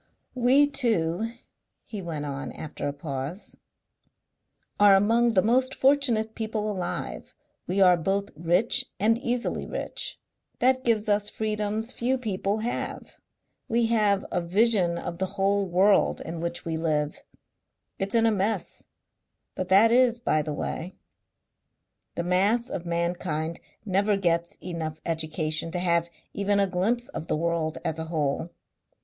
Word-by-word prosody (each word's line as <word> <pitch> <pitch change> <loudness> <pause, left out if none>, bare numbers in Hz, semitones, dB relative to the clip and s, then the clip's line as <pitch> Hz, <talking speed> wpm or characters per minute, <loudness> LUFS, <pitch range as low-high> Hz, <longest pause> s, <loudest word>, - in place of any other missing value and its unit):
"We 255 +3 +4
two," 225 - +1 0.5
he 210 -3 -6
went 160 -4 -4
on, 140 0 -5
after 155 - -5
a - - -1
pause, 145 +5 -6 1.2
"are 205 -1 +7
among 230 +4 +3
the 185 - +5
most 255 +4 +2
fortunate 255 -6 +2
people 215 -1 -2
alive. 185 -3 -4 0.3
We 195 +2 +1
are 180 -2 +7
both 195 +4 -1
rich 180 - +2 0.2
and 225 +3 +3
easily 245 -1 -2
rich. - - -4 0.4
That 260 +1 +2
gives 225 -3 +1
us 205 0 +1
freedoms 215 +1 -2
few 255 +2 0
people 210 -2 -2
have. 240 +2 -4 0.5
We 235 0 +2
have 205 -3 +2
a 180 - 0
vision 185 -1 +3
of 170 0 -5
the 190 - 0
whole 200 0 +2
world 190 +3 +3
in 165 0 -6
which 170 +1 -4
we 165 -1 -2
live. 150 -2 -1 0.8
It's 195 +3 -2
in 230 0 +4
a 225 - +4
mess 205 -1 -2 0.7
but 185 - -4
that 205 +4 +6
is 245 -1 +4
by 195 -10 +1
the 150 - -4
way. 165 +4 -4 1.2
The 170 - -2
mass 200 +7 +2
of 175 - -4
mankind 170 -1 -2 0.3
never 200 +1 +2
gets 170 -2 0
enough 160 -3 -4
education 155 0 -2
to 175 - -3
have 170 -1 +1 0.2
even 200 0 +1
a 200 - +4
glimpse 205 +7 0
of 160 - -6
the - - 0
world 165 -1 -1
as 160 - -2
a 160 - -3
whole. 160 0 -1
195 Hz, 145 wpm, -26 LUFS, 170-225 Hz, 1.2 s, are